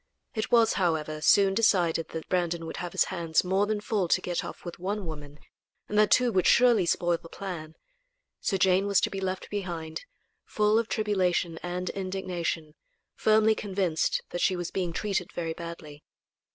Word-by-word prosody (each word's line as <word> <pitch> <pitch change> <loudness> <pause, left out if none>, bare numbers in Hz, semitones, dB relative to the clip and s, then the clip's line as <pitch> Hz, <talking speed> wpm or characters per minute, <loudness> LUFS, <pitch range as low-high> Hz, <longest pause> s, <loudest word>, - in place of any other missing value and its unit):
It 220 -1 -2
was, 230 -2 +5
however, 155 -3 0
soon 195 +4 +5
decided 180 -7 +2
that 160 -1 -6
Brandon 170 -2 -1
would 160 - -6
have 175 -1 -5
his - - +4
hands 165 -3 +1
more 190 +3 +1
than 215 0 -1
full 205 -3 -1
to - - +3
get 175 -1 -3
off - - -9
with 175 - -7
one 200 +2 -3
woman, 150 -2 -8 0.5
and 210 - -5
that 215 - +5
two 250 -1 +4
would 185 -4 +2
surely 235 -7 +5
spoil 175 0 +1
the 165 - -12
plan. 165 -5 -7 0.6
So 195 - 0
Jane 190 +1 +3
was 200 -1 +4
to - - 0
be 195 - -4
left 185 0 -4
behind, 170 -5 -5 0.4
full 210 +1 +2
of 230 - -2
tribulation 185 -7 0
and 180 +1 -3
indignation, 185 -5 -3 0.4
firmly 220 0 +4
convinced 190 -6 -1
that 175 - -3
she 185 - +2
was 175 -1 -4
being 180 -3 -2
treated 190 -1 -2
very 165 -2 -3
badly. 160 -3 -9
180 Hz, 180 wpm, -28 LUFS, 170-200 Hz, 0.6 s, was